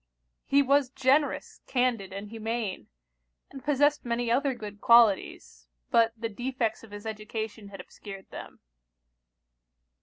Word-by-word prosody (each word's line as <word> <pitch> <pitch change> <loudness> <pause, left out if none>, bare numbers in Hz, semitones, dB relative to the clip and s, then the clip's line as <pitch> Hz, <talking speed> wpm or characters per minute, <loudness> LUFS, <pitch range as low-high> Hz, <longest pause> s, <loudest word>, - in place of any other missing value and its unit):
He 280 0 +4
was 280 -1 +3
generous, 270 +3 +1
candid, 245 -7 0
and 200 +2 -7
humane; 225 - -4 0.6
and 270 - -10
possessed 290 0 +2
many 235 0 -1
other 270 +2 +1
good 210 -2 -9
qualities, 210 - +3 0.2
but 230 -1 +4
the 230 +1 -3
defects 240 +1 -3
of 225 - -13
his 205 +1 -9
education 215 -1 -5
had 200 -1 -11
obscured 195 -2 -10
them. - - -10
230 Hz, 125 wpm, -28 LUFS, 210-260 Hz, 0.6 s, He